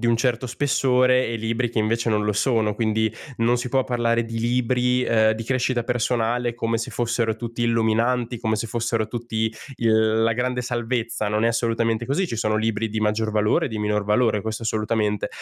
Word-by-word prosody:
di 120 - 0
un 115 - +3
certo 125 +1 0
spessore 130 -1 +2
e 115 - -2
libri 115 +2 -1
che 115 - -2
invece 115 +2 +1
non 105 -1 +1
lo 105 - +1
sono, 110 -1 +1
quindi 110 -1 0 0.2
non 120 +1 +2
si 125 0 -3
può 130 +1 +1
parlare 115 -2 +1
di 115 0 -5
libri, 125 +1 +1
ehm, 110 -1 +3
di 115 - -6
crescita 125 -1 0
personale 120 0 0
come 115 -1 -1
se 115 - -4
fossero 115 -2 -1
tutti 120 0 -5
illuminanti, 115 +1 +1
come 110 -1 0
se 115 +2 -3
fossero 115 -1 -1
tutti 110 -1 -3 0.2
il 110 -1 +2
la 115 - +3
grande 125 +1 -1
salvezza. 120 -3 -2
Non 105 +1 0
è 115 - +4
assolutamente 115 0 0
così. 175 +8 0
Ci 115 - -5
sono 110 -1 0
libri 110 0 -1
di 110 +1 -3
maggior 110 +1 0
valore 105 0 +2
e - - -4
di 110 -2 -5
minor 105 0 0
valore, 105 0 +2
questo 110 +1 -4
assolutamente, 105 -1 0
115 Hz, 200 wpm, -23 LUFS, 110-120 Hz, 0.2 s, è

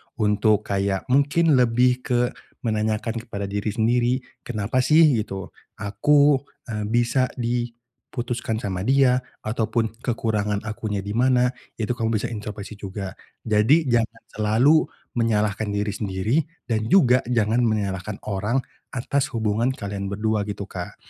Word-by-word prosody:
untuk 105 0 +2
kayak 100 -1 -1
mungkin 145 +2 +4
lebih 125 +1 +3
ke 120 -2 +1 0.4
menanyakan 110 0 -1
kepada 110 -3 -6
diri 105 +1 -2
sendiri, 120 +3 +2 0.3
"Kenapa 110 +1 -1
sih 150 +6 +5 0.2
gitu 95 -3 -5 0.2
aku, 140 +7 +3 0.3
eee, 105 -1 -2
bisa 120 +3 +2
di 120 -1 -1 0.4
putuskan 120 -2 -3
sama 95 -2 -2
dia?" 130 -2 +4 0.2
ataupun 110 0 -1
"Kekurangan 105 -4 -1
akunya 110 -2 -3
di 100 - -5
mana?" 125 +1 +3 0.2
itu 110 0 -2
kamu 115 -2 0
bisa 115 +3 -2
intropeksi 105 -2 -7
juga. 95 -1 -5 0.3
Jadi 120 +7 +3
jangan 115 -1 0
selalu 115 +9 +3 0.3
menyalahkan 110 -2 +1
diri 105 0 -1
sendiri 100 +6 -1 0.3
dan 110 -2 -1
juga 125 -7 +5
jangan 115 -1 +2
menyalahkan 100 -2 -1
orang 105 +6 -1 0.3
atas 135 +2 0
hubungan 110 +1 +1
kalian 100 -3 -5
berdua 105 +2 0
gitu, 100 0 -4
Kak. 90 -3 -7
110 Hz, 130 wpm, -23 LUFS, 105-125 Hz, 0.4 s, sih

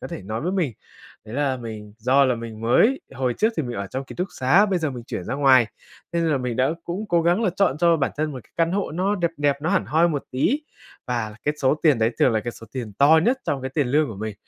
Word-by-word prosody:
có - - -6
thể - - -7
nói 110 +4 -4
với 180 +4 -2
mình. 170 -10 0 0.5
Đấy 110 - -9
là 140 -2 0
mình 110 -3 -8
do 130 +4 +4
là 125 -2 +2
mình 115 -1 -8
mới, 215 - +3
hồi 125 -2 -1
trước 220 +2 +1
thì 160 - 0
mình 120 -2 -5
ở 100 - -3
trong 130 +7 -5
ký - - -10
túc 180 +2 -2
xá, 170 +12 +4
bây 190 -3 0
giờ 155 -3 -1
mình 120 -2 -8
chuyển 90 - -5
ra - - -3
ngoài, 130 -4 +5 0.5
nên 170 -1 +1
là 150 -4 +1
mình 125 -2 -3
đã 130 +3 +2
cũng 190 +5 -4
cố 170 -1 +2
gắng 175 +6 +2
là 195 - +2
chọn 170 -8 +2
cho 170 -1 +4
bản 135 - 0
thân 155 0 -1
một 130 - -7
cái - - -28
căn 165 0 +1
hộ 200 -2 -1
nó 185 +5 0
đẹp 170 -3 0
đẹp, 145 -1 +1
nó 160 - 0
hẳn 195 - +2
hoi 165 +3 +3
một 145 -4 -2
tí 235 - +1 0.5
và 115 -4 -2
cái 150 - +1
số 135 +1 +3
tiền 150 -7 +4
đấy 110 +1 +2
thường 125 - +4
là 110 - +1
cái 120 - -4
số 115 - -13
tiền 120 -6 -5
to 155 +3 +6
nhất 255 +2 +2
trong 135 -2 -2
cái 130 - -4
tiền 145 -4 +1
lương 150 +2 +2
của 110 - -7
mình. 110 0 -5
140 Hz, 285 wpm, -23 LUFS, 120-170 Hz, 0.5 s, to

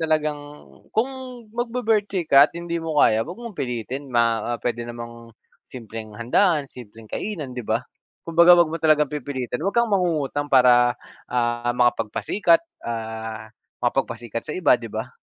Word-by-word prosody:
talagang 155 -2 0 0.5
kung 225 +4 +1 0.4
magbi-birthday 225 -6 0
ka 140 +1 +7
at - - -26
hindi 170 0 -3
mo 160 -2 0
kaya, 110 +1 +4
wag 175 - -8
mong 235 -5 -8
pilitin. 125 +3 -4
Ma 115 0 +1
pwede 120 -1 -2
namang 115 -1 -9 0.4
simpleng 110 -3 -8
handaan, 145 - +2
simpleng 115 -3 -13
kainan, 165 -11 -4
'di 125 - -5
ba? 110 +3 0 0.4
'Kumbaga, 170 +1 +7
wag 170 -2 +5
mo 165 - -2
talagang 150 -2 +3
pipilitin. 130 -2 -4
Wag 195 - -1
kang 235 -1 +3
mangungutang 150 -6 0
para, 120 -2 +5 0.3
ah, 120 0 0
makapagpasikat, 125 - +2 0.2
ah, 110 -1 -5 0.3
makapagpasikat 120 -2 -2
sa 150 - -5
iba, 175 -8 +4
'di 115 -2 -9
ba? - - -4
130 Hz, 145 wpm, -23 LUFS, 120-165 Hz, 0.5 s, ka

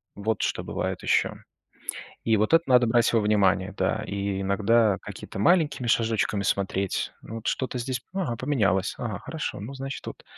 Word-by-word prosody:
Вот 110 +1 -1
что - - -1
бывает - - -3
ещё. - - +2 0.9
И 110 -2 +3
вот 110 +8 +1
это 165 0 +6
надо 125 -2 +5
брать 120 0 +3
во 115 - +5
внимание, 100 -2 +2
да. 110 - 0
И 100 -1 -2
иногда 105 +2 +3
какими-то - - -8
маленькими 150 - +3
шажочками 110 -3 +1
смотреть. 95 -1 -1
Вот 115 0 -8
что-то 130 -1 -1
здесь, 125 0 -3
ага, 165 - -2
поменялось. 105 -8 +1
Ага, 105 -5 -4
хорошо, 160 +7 -5
ну, 110 +7 -7
значит, 135 0 -6
вот - - -8
110 Hz, 160 wpm, -26 LUFS, 100-125 Hz, 0.9 s, это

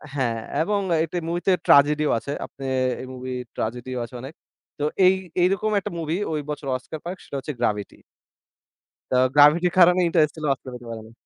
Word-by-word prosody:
হ্যাঁ, 125 -5 0
হ্যাঁ। - - -4
এবং 205 +4 0 0.3
একটা 165 +2 -5
মুভিতে 175 +2 0 0.2
ট্র্যাজেডি 150 +2 +5
ও - - +2
আছে। 140 - -6
আপনি 135 - -12 0.4
এই 130 - -8
মুভি 130 0 -6 0.2
ট্র্যাজেডি 120 +3 -4
ও - - -1
আছে 115 - -13
অনেক। 135 +4 -8 0.5
তো - - -2 0.2
এই 185 - +7 0.3
এইরকম 195 +4 +2
একটা 195 - -6
মুভি 160 0 -2
ঐ - - -3 0.2
বছর 145 -1 -6
অস্কার 155 +4 -9
পায় 175 +2 -5
সেটা - - -8
হচ্ছে 150 +3 -5
Gravity. 105 -4 -2 1.2
তো - - +3 0.2
Gravity 150 +4 +6
এর - - -9
কারণে 180 0 +6
Interstellar 155 -2 +1
অস্কার 130 - -11
পেতে 120 -1 -10
পারে 115 -1 -6
নি। 110 - -16
150 Hz, 190 wpm, -23 LUFS, 130-170 Hz, 1.2 s, এই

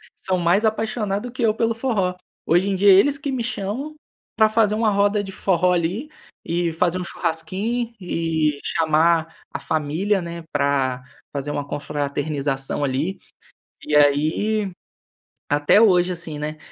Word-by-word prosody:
São 185 -1 -1
mais 175 +5 +2
apaixonado 220 0 -1
que 255 - -7
eu 220 -2 +3
pelo 230 +1 0
forró. 215 -7 -1 0.3
Hoje 175 +4 +2
em 195 - 0
dia 200 +2 +4
é - - +9
eles 275 +10 +4
que 285 -2 -3
me 255 -3 -2
chamam 245 +7 -4 0.4
pra 220 -1 +4
fazer 215 -1 +2
uma 220 0 +2
roda 205 0 +2
de 195 - -7
forró, 180 -2 +1
ali, 180 - -1 0.3
e 170 0 -1
fazer 180 +2 0
um - - -3
churrasquinho 225 +9 -3
e 160 -4 -1
chamar 160 +1 +2 0.2
a - - -3
família, 160 +7 0
né, 170 -1 -7
pra 140 -3 0 0.3
fazer 140 0 -3
uma 145 -1 -3
confraternização, 145 -1 -2
ali. 145 +7 -1 0.7
E 150 - -1
aí, 155 +9 +2 0.8
até 145 +8 +4
hoje, 180 -4 +4
assim, 165 -3 -6
né, 155 +1 -4
180 Hz, 150 wpm, -22 LUFS, 155-215 Hz, 0.8 s, é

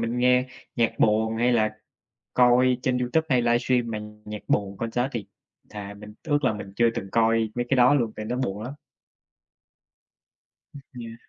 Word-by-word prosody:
mình 125 - -2
nghe 125 +1 +3 0.3
nhạc 115 -2 +2
buồn, 110 +1 +2
hay 120 +2 +2
là 110 -2 +2 0.6
coi 125 +1 +4
trên 125 0 0
YouTube 125 +6 0
hay 125 -3 +3
livestream 120 0 +1
mà 110 - -3
nh 105 0 -11
nhạc 105 0 -6
buồn, 100 -1 0
concert 115 +3 -1
thì 115 -5 -4 0.4
thà 100 -1 -7
mình 105 +1 -12
ước 145 -2 0
là 125 - +2
mình 100 -2 -8
chưa 120 0 +4
từng 95 - -5
coi 115 -1 +2
mấy 120 0 -1
cái 135 - +2
đó 125 +2 +6
luôn, 120 -6 +1
tại 110 - -6
nó 120 +3 -2
buồn 105 -5 -3
lắm. 130 +4 -6 2.0
Ừm, 140 - -9 0.2
yeah. 115 -1 -7
115 Hz, 185 wpm, -25 LUFS, 110-125 Hz, 2.0 s, đó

